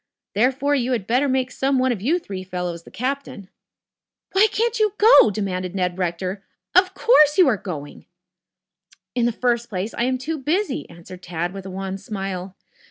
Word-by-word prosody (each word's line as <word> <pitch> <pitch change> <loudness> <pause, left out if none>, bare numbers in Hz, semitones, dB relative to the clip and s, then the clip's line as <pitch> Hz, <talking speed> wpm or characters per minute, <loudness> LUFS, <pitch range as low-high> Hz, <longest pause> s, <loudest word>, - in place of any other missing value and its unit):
Therefore, 265 +6 +2
you 255 -2 +1
had 215 -5 -2
tetter 255 +5 +2
make 260 -1 0
some 270 +1 0
one 255 0 +2
of 220 -6 -3
you 300 - +2
three 195 - -7
fellows 180 -2 -4
the - - -12
captain." 255 -5 -4 0.8
"Why 395 +3 +5
can't 460 +2 0
you 425 -2 +2
go?" 435 - +7
demanded 185 -3 -3
Ned 180 -1 -1
Rector. 185 +2 -3 0.3
"Of 370 +1 +4
course 305 - +5
you 365 -4 +6
are 250 - +3
going." 155 -7 -8 1.1
"In 240 -1 +1
the - - +1
first 235 0 -1
place, 195 +2 -3
I 235 - 0
am 255 0 0
too 305 +5 -4
busy," 310 +2 -1
answered 170 +2 -12
Tad 175 0 -4
with 195 -1 -8
a - - -6
wan 190 +1 -5
smile. 195 -2 -5
230 Hz, 180 wpm, -22 LUFS, 185-275 Hz, 1.1 s, go